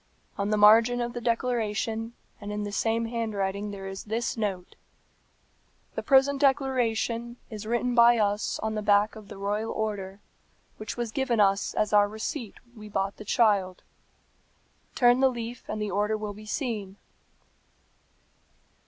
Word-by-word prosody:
On 200 0 -2
the 215 - +1
margin 225 +4 +6
of 240 0 -2
the 240 - -5
declaration, 230 -1 -1 0.3
and 205 0 -6
in 210 0 -3
the 205 - -4
same 225 +2 0
handwriting 210 -3 -2
there 195 -1 -7
is 195 0 -7
this 225 +2 -2
note, 195 -5 -3 1.2
'The - - -3
present 275 +1 +3
declaration 240 -4 +1
is 215 -1 -7
written 240 +2 0
by 235 0 +6
us 205 -1 0
on 220 0 -1
the 215 - -2
back 205 +1 +3
of 215 -2 -11
the - - -10
royal 205 +3 -2
order, 200 -3 -4 0.6
which 215 +2 -6
was 240 -2 -3
given 250 -3 0
us 195 -1 +2
as 215 0 0
our 205 0 +6
receipt 220 +2 -5
when 240 -2 -18
we 210 0 -10
bought 195 0 -2
the - - -8
child. 200 -5 +2 1.1
Turn 245 0 +5
the 265 0 +5
leaf 240 -1 -6
and - - -4
the 210 -1 -2
order 210 +3 0
will 210 -1 -5
be 215 +1 -12
seen.'" 210 -6 -3
220 Hz, 160 wpm, -27 LUFS, 205-235 Hz, 1.2 s, margin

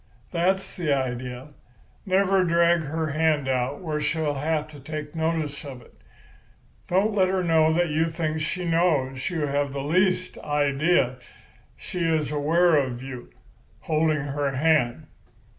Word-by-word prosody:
That's 185 +3 0
the 165 -5 -1
idea. 130 0 -2 0.6
Never 190 0 +3
drag 170 0 +3
her 155 +1 -3
hand 155 -2 +1
out 130 +3 -1
where 155 -4 -3
she'll 150 0 0
have 150 +2 -1
to 150 -2 -12
take 150 +1 -6
notice 160 -3 -2
of 135 -4 -8
it. - - -21 0.9
Don't 195 +4 +2
let 190 -2 +3
her 185 0 0
know 160 -2 +4
that 175 +1 +1
you 160 +2 +1
think 160 -1 -2
she 170 +3 -2
knows 150 -6 +1
you 170 -4 -3
have 140 -1 -1
the 140 -1 -3
least 185 +4 +1
idea 145 -1 +1 0.6
she 180 - -6
is 160 -3 0
aware 155 +1 +3
you 125 0 -7
are - - -31 0.4
holding 155 -1 +1
her 145 0 -2
hand. 150 -1 +2
155 Hz, 145 wpm, -25 LUFS, 140-170 Hz, 0.9 s, know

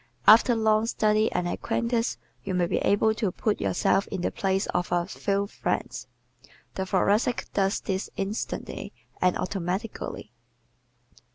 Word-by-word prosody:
After 230 +3 +7
long 220 0 +2
study 215 -1 +2
and 175 - -1
acquaintance 235 +6 -1 0.3
you 190 -2 -2
may 180 -1 +2
be - - -1
able 220 +2 +3
to 215 -3 -1
put 210 +3 -1
yourself 100 - +1
in 190 - -4
the - - 0
place 195 0 0
of 180 0 -1
a 175 -1 +2
few 200 +1 -1
friends. 200 - -3 0.7
The 190 0 -3
Thoracic 205 +6 +2
does 195 0 +1
this 190 0 -3
instantly 200 +3 -4 0.3
and 180 -1 +3
automatically. 190 +4 -4
200 Hz, 140 wpm, -26 LUFS, 185-220 Hz, 0.7 s, After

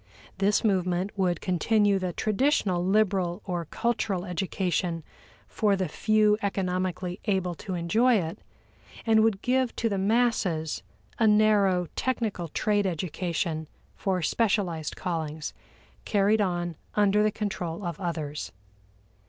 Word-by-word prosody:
This 200 +3 +2
movement 185 -2 0
would 180 -4 0
continue 200 +2 +2
the 185 -1 -2
traditional 210 - +1
liberal 190 -3 +1
or 175 -3 -2
cultural 205 -1 -1
education 180 -2 -1 0.4
for 205 -2 +1
the 190 -2 -1
few 215 +5 +2
economically 185 -2 -2
able 190 -4 0
to 190 -3 -4
enjoy 220 +9 +3
it, 165 -5 -2 0.7
and 220 -1 +5
would 220 -3 +1
give 255 -1 +1
to 230 - 0
the 200 -2 -1
masses 195 - +1 0.4
a 220 - +4
narrow 210 -4 +4
technical 220 -9 -1
trade 205 +4 +1
education 170 -2 -2 0.3
for 185 -3 -1
specialized 185 -6 0
callings, 160 -4 -3 0.5
carried 210 +1 +2
on 175 -4 -1 0.2
under 210 0 +4
the 215 - +4
control 195 -4 -4
of 170 -3 -4
others. 155 -5 -4
190 Hz, 120 wpm, -27 LUFS, 175-210 Hz, 0.7 s, and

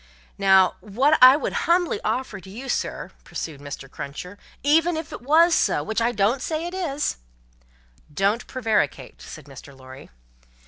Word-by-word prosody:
"Now, 190 -1 +4
what 255 +9 +2
I 255 +2 +9
would - - -3 0.2
humbly 345 - +2
offer 220 -2 -2
to 190 - -14
you, 245 +7 -8
sir," - - -3
pursued 150 -4 -7
Mr. 140 -1 -8
Cruncher, 180 +9 -8 0.2
"even 320 +4 +3
if 320 0 -6
it - - -8
wos 325 +6 +4
so, - - +1
which 220 +2 -2
I 235 +1 +2
don't 225 +4 +1
say 315 +3 -3
it 350 - -6
is 310 -6 -2 0.5
" - - -34 0.2
"Don't 200 +9 0
prevaricate," 215 - -2
said 155 - -11
Mr. 140 0 -13
Lorry. 130 +1 -13
220 Hz, 165 wpm, -23 LUFS, -, 0.5 s, I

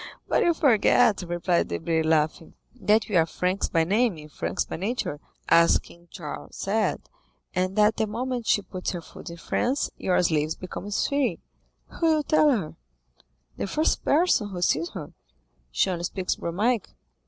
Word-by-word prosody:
"But - - +2
you 340 -1 +3
forget," 240 -5 +4
replied 175 0 0
Debray, 160 - -1
laughing, 160 0 0 0.2
"that 220 -3 +2
we 210 - -3
are 165 0 +4
Franks 185 +4 -1
by 165 -1 +2
name 210 +2 +1
and 150 0 -12
franks - - -2
by - - -6
nature, 195 -5 -3 0.3
as 170 0 +6
King 170 0 -16
Charles 155 -3 -8
said, 210 +2 -1 0.5
and 185 +1 -1
that 215 +1 +4
the 220 - +1
moment 240 +2 -3
she 205 - +3
puts 185 0 -4
her 175 - -4
foot - - -11
in 170 - -8
France 255 +10 -1
your 185 - +1
slave 155 -2 0
becomes 200 +2 -3
free." 280 -3 0 0.6
"Who 330 - +3
will 310 -2 +3
tell 305 0 +4
her?" 205 - -1 0.8
"The - - -2
first 310 +11 0
person 290 - +2
who 180 -2 -4
sees 165 +1 +1
her." 155 -6 -7 0.6
"She - - +1
only 175 -1 -3
speaks 185 0 -2
Romaic." 210 +6 0
190 Hz, 165 wpm, -25 LUFS, 170-235 Hz, 0.8 s, as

